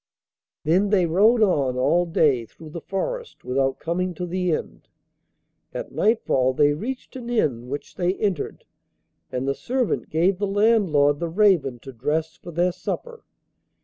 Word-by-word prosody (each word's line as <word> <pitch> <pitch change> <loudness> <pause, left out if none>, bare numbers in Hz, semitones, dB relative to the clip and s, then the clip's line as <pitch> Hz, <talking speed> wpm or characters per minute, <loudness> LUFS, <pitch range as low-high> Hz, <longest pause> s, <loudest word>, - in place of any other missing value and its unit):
Then 185 +6 +2
they 195 -4 +3
rode 215 +8 +4
on 140 -10 +1
all 175 +7 +2
day 140 -8 +2
through 155 +5 -13
the 170 - -6
forest 475 - -4
without 135 +1 0
coming 180 +2 -2
to 180 - -4
the 180 0 -1
end. - - -4 0.9
At - - -5
nightfall 135 - +2
they 145 +2 +3
reached 250 - -6
an 245 -2 -7
inn, 125 - 0
which 145 +2 -6
they 180 +1 0
entered, 195 -8 -2 0.7
and 130 +1 -2
the 140 - +2
servant 250 - -2
gave 180 +4 +2
the 205 - 0
landlord 195 -9 +3
the 170 - -2
raven 170 - +3
to 135 - -10
dress 155 +6 -2
for 175 - -12
their 175 +2 +1
supper. 465 - -6
175 Hz, 155 wpm, -23 LUFS, 145-205 Hz, 0.9 s, rode